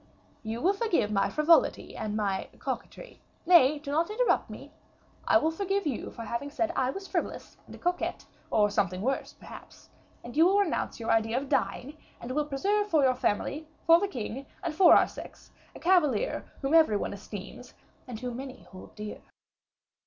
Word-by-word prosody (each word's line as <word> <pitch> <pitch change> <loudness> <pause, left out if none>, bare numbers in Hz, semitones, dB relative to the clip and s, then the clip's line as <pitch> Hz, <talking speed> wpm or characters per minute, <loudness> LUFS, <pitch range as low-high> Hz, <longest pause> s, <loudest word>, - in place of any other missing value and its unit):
You 225 +2 -5
will 375 +5 +3
forgive 390 - 0
my 195 -1 +1
frivolity 310 +2 +2
and 215 0 -3
my 200 -3 -2
coquetry. - - -7 0.2
Nay, 305 -5 +6
do 290 -1 -7
not 325 +5 +1
interrupt 470 +3 +1
me. - - -10 0.6
I 325 - +6
will 320 0 +1
forgive 395 +3 -1
you 275 -6 -3
for 230 - -8
having 235 +6 -4
said 335 +3 -1
I 255 - +1
was 390 +8 -6
frivolous - - -4
and - - -11
a - - -12
coquette, 355 0 -2 0.2
or 210 -1 +3
something 195 -2 -1
worse, 270 +2 -2
perhaps; - - -14 0.3
and 240 +2 -9
you 325 +3 +6
will 390 +2 +3
renounce 375 -10 -1
your 230 - -1
idea 225 +1 +2
of 270 +1 -3
dying, 285 +5 -1 0.2
and 240 - -7
will 295 +3 0
preserve 400 +9 0
for 315 -7 +3
your 260 -1 +4
family, 270 +6 -2 0.2
for 335 0 +7
the 405 - 0
king, 265 - -6 0.2
and 335 -3 -2
for 345 +1 +7
our - - +5
sex, - - -11 0.2
a - - -9
cavalier 335 - +1
whom 270 +3 0
every 315 -11 +5
one - - -3
esteems, 205 +4 -9 0.3
and 240 -2 -7
whom 245 -1 -4
many 265 0 -8
hold 185 - -12
dear." 210 0 -7
280 Hz, 185 wpm, -28 LUFS, 225-335 Hz, 0.6 s, for